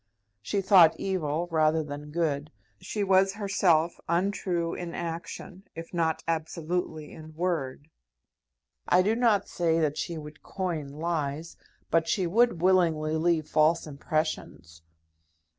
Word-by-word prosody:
She 200 Hz, -, -1 dB
thought 185 Hz, -5 st, +6 dB
evil 170 Hz, -3 st, -1 dB
rather 155 Hz, 0 st, +2 dB
than 150 Hz, 0 st, -7 dB
good. 150 Hz, -2 st, -1 dB, 0.3 s
She 200 Hz, +3 st, -3 dB
was 195 Hz, 0 st, +3 dB
herself 185 Hz, -5 st, +1 dB
untrue 175 Hz, -1 st, 0 dB
in 175 Hz, -1 st, -6 dB
action, 170 Hz, +3 st, -6 dB
if 165 Hz, +2 st, -8 dB
not 165 Hz, -2 st, 0 dB
absolutely 160 Hz, -1 st, -3 dB
in 155 Hz, 0 st, -12 dB
word. 155 Hz, -5 st, -2 dB, 1.0 s
I 180 Hz, +1 st, +5 dB
do 215 Hz, +4 st, +2 dB
not 225 Hz, -5 st, +2 dB
say 165 Hz, -2 st, +1 dB
that 155 Hz, -1 st, 0 dB
she 165 Hz, +1 st, -3 dB
would 150 Hz, 0 st, -10 dB
coin 175 Hz, -6 st, -4 dB
lies, 155 Hz, +1 st, -3 dB, 0.4 s
but 165 Hz, 0 st, +2 dB
she 185 Hz, 0 st, +1 dB
would 215 Hz, 0 st, +2 dB
willingly 165 Hz, -4 st, +3 dB
leave 160 Hz, -1 st, +1 dB
false 155 Hz, +2 st, +2 dB
impressions. 145 Hz, -, -4 dB
165 Hz, 125 wpm, -27 LUFS, 155-180 Hz, 1.0 s, thought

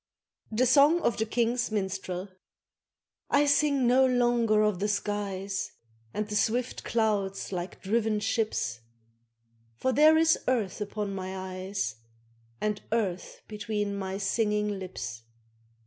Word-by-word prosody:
THE 230 Hz, +4 st, +2 dB
SONG 285 Hz, +7 st, +5 dB
OF -, -, +1 dB
THE 220 Hz, -, 0 dB
KING'S 240 Hz, +1 st, 0 dB
MINSTREL 190 Hz, -2 st, -3 dB, 1.0 s
I 285 Hz, +1 st, +4 dB
SING 285 Hz, -2 st, +3 dB
no 255 Hz, +2 st, +5 dB
longer 240 Hz, -4 st, +3 dB
of 210 Hz, -4 st, +1 dB
the 205 Hz, -, 0 dB
skies, 200 Hz, -2 st, -2 dB, 0.4 s
And 210 Hz, -, -3 dB
the 210 Hz, -, -4 dB
swift 240 Hz, +4 st, 0 dB
clouds 205 Hz, -5 st, 0 dB
like 180 Hz, 0 st, -5 dB
driven 215 Hz, +1 st, +1 dB
ships, 210 Hz, -, -1 dB, 1.0 s
For 260 Hz, -, 0 dB
there 310 Hz, +3 st, +6 dB
is 320 Hz, 0 st, +4 dB
earth 225 Hz, -6 st, 0 dB
upon 205 Hz, -1 st, -3 dB
my 190 Hz, 0 st, -5 dB
eyes 185 Hz, -, -4 dB, 0.6 s
And 210 Hz, -1 st, -1 dB
earth 200 Hz, -6 st, -2 dB
between 210 Hz, -1 st, -3 dB
my 190 Hz, -1 st, -3 dB
singing 210 Hz, 0 st, 0 dB
lips. 125 Hz, -11 st, -6 dB
210 Hz, 125 wpm, -28 LUFS, 195-235 Hz, 1.0 s, there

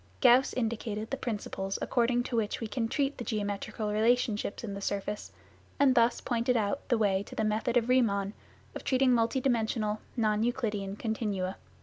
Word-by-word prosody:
Gauss 255 Hz, +3 st, +6 dB
indicated 220 Hz, -2 st, -3 dB
the -, -, +1 dB
principles 205 Hz, -5 st, -3 dB
according 245 Hz, 0 st, +1 dB
to 245 Hz, -, -4 dB
which 220 Hz, -2 st, 0 dB
we 230 Hz, -, -3 dB
can 225 Hz, +1 st, -2 dB
treat 275 Hz, +4 st, -1 dB
the -, -, -3 dB
geometrical 210 Hz, -1 st, -3 dB
relationships 220 Hz, -1 st, +1 dB
in 210 Hz, -3 st, -4 dB
the 200 Hz, -, -6 dB
surface, 200 Hz, +1 st, -3 dB, 0.5 s
and 280 Hz, -2 st, +5 dB
thus 235 Hz, -1 st, +3 dB
pointed 240 Hz, 0 st, +1 dB
out 220 Hz, +7 st, -2 dB
the 240 Hz, -, +3 dB
way 200 Hz, -3 st, +2 dB
to 200 Hz, -, -10 dB
the 220 Hz, -, 0 dB
method 220 Hz, +3 st, +1 dB
of 235 Hz, -, +2 dB
Riemman 205 Hz, -6 st, +2 dB, 0.4 s
of -, -, -7 dB
treating 260 Hz, -1 st, +3 dB
multi 230 Hz, +2 st, +2 dB
dimensional, 220 Hz, -4 st, 0 dB, 0.2 s
non 215 Hz, -2 st, +2 dB
Euclidean 215 Hz, -5 st, -1 dB
continuum. 210 Hz, -4 st, -2 dB
225 Hz, 170 wpm, -30 LUFS, 210-245 Hz, 0.5 s, Gauss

